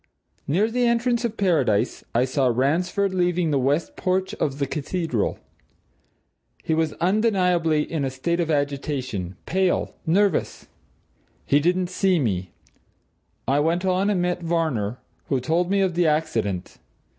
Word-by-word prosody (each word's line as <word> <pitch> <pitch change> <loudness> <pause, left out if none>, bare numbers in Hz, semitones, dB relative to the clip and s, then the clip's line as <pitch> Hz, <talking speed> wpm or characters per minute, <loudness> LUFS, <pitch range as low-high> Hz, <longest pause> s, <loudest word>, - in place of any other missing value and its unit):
Near 200 +10 +1
the 245 0 +2
entrance 235 0 +1
of 225 -1 -3
Paradise, 145 - +1
I 120 +2 +4
saw 130 0 +1
Ransford 170 - +1
leaving 180 -2 +1
the 140 - +2
west 140 +5 0
porch 185 +1 -1
of 140 -2 -1
the 140 - 0
Cathedral. 150 - -2 1.3
He 160 - 0
was 160 -1 +1
undeniably 180 -5 +2
in 155 -2 -3
a 135 - 0
state 170 +7 -2
of 170 -2 0
agitation 140 - -2
pale, 190 0 0
nervous. 195 +1 +1 0.8
He 145 - +4
didn't 180 +3 +1
see 185 0 +2
me. 95 - -1 1.0
I 135 +3 +3
went 170 +5 +1
on 190 +2 +2
and 185 -4 +1
met 180 0 -1
Varner, 155 -10 -1 0.3
who 135 - +1
told 165 +7 0
me 200 0 +2
of 190 -2 +1
the 170 0 +2
accident. 115 - -1
165 Hz, 145 wpm, -23 LUFS, 140-185 Hz, 1.3 s, I